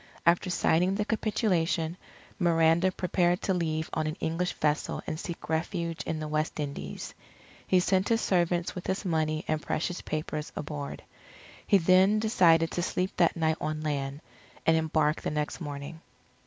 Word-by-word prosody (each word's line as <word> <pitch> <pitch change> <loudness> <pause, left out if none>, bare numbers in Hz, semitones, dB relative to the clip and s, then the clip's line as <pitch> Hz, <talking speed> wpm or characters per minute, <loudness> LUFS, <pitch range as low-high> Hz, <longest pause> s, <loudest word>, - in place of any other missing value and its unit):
After 170 +2 +3
signing 180 +1 +2
the 210 +1 -1
capitulation, 180 -7 0 0.4
Miranda 170 +1 +4
prepared 180 -1 +1
to 190 - +1
leave 160 -3 -1
on 155 -1 0
an 155 +3 -3
English 165 +3 -1
vessel 150 0 -1
and 155 - -4
seek 170 -1 -6
refuge 165 +1 -2
in 160 - -2
the 155 - -4
West 155 +1 -1
Indies. 140 - -5 0.5
He 185 - +4
sent 185 +1 +1
his 225 -1 +3
servants 175 -4 +1
with 180 - -7
his 190 +2 -2
money 155 -2 0
and 155 -1 0
precious 175 +4 -2
papers 155 -1 -4
aboard. 145 -1 -5 0.6
He 200 - +6
then 185 +4 +5
decided 170 -7 +4
to 175 - -1
sleep 185 +1 -1
that 170 -1 +3
night 160 -1 +1
on 155 0 -2
land, 140 -1 -3 0.4
and 165 - +5
embark 155 -1 +1
the - - -2
next 150 +3 -3
morning. 145 +1 -6
165 Hz, 160 wpm, -28 LUFS, 155-180 Hz, 0.6 s, He